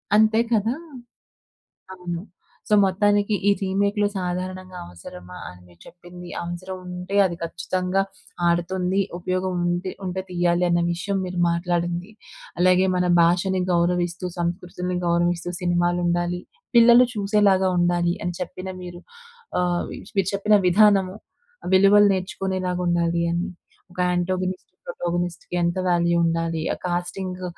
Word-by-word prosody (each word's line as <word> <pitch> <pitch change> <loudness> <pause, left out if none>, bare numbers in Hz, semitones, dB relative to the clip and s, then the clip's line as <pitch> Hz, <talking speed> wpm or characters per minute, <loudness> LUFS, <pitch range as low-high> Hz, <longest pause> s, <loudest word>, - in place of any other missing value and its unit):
అంతే 220 +1 +4
కదా! 225 +2 +2 1.2
అవును. 175 -2 -5 0.5
సో, 210 - 0
మొత్తానికి 205 +2 +2
ఈ - - +7
రీమేక్‌లు 200 +2 +1
సాధారణంగా 185 0 -4
అవసరమా 90 +1 -11
అని 90 0 -11
మీరు 85 -1 -21
చెప్పింది. 175 0 -12
అవసరం 175 +2 -6
ఉంటే 180 +2 -5
అది 175 -2 -2
ఖచ్చితంగా 180 +3 -1 0.5
ఆడుతుంది. 180 +2 0 0.2
ఉపయోగం 185 +1 -2
ఉంటే, 175 +1 -1
ఉంటే 190 +1 -3
తీయాలి 175 0 +1
అన్న 170 0 +2
విషయం 195 +3 -2
మీరు 180 -1 -4
మాట్లాడింది. 175 +2 -1 0.5
అలాగే 185 +1 +4
మన 180 - +1 0.2
భాషను 180 +2 +2
గౌరవిస్తూ, 175 +1 0
సంస్కృతిని 180 +1 -3
గౌరవిస్తూ 175 0 +1
సినిమాలు 175 0 +1
ఉండాలి. 175 +1 0 0.4
పిల్లలు 235 +1 +7
చూసేలాగా 200 -2 +3
ఉండాలి 175 0 +2
అని 175 - -2
చెప్పిన 185 +1 -6
మీరు 175 -1 -9 0.6
ఆహ్, 175 -1 0 0.3
మీరు 195 -2 +1
చెప్పిన 210 +2 +3
విధానము 195 0 +4 0.6
విలువలు 200 +2 +6
నేర్చుకునేలాగా 185 -1 -2
ఉండాలి 170 0 +1
అని. 175 +3 -1 0.4
ఒక 180 - -12
ఆంటోగోనిస్ట్, 185 +1 -2 0.2
ప్రోటోగోనిస్ట్‌కి 175 - -3
ఎంత 170 +1 0
వాల్యూ 170 -1 +2
ఉండాలి, 165 -1 0
ఆ - - -4
కాస్టింగ్ 180 +1 -3
180 Hz, 120 wpm, -23 LUFS, 175-190 Hz, 1.2 s, ఈ